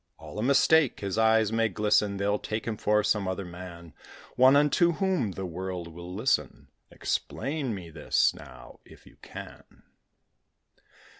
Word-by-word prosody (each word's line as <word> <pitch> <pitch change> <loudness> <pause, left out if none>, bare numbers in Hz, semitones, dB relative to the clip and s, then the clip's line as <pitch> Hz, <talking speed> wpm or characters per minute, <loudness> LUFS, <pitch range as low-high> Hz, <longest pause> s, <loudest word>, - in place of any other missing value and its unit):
All - - -9
a - - -1
mistake: 140 +3 +3
his 100 +1 -2
eyes 110 -1 +3
may 115 0 +1
glisten; 105 0 +1
They'll 100 +1 0
take 110 +1 -4
him 115 - -2
for 105 0 +1
some 105 -3 0
other 95 +1 -3
man: 85 -2 -10 0.4
One 130 +2 +6
unto 150 +4 +3
whom 175 - 0
the 95 - -5
world 90 0 -5
will 85 +2 -10
listen. 95 - -1 0.2
Explain 140 -6 -3
me 85 -4 -9
this, 80 - +1
now, - - -13
if - - -18
you - - -19
can. - - -12
105 Hz, 150 wpm, -27 LUFS, 90-125 Hz, 0.4 s, One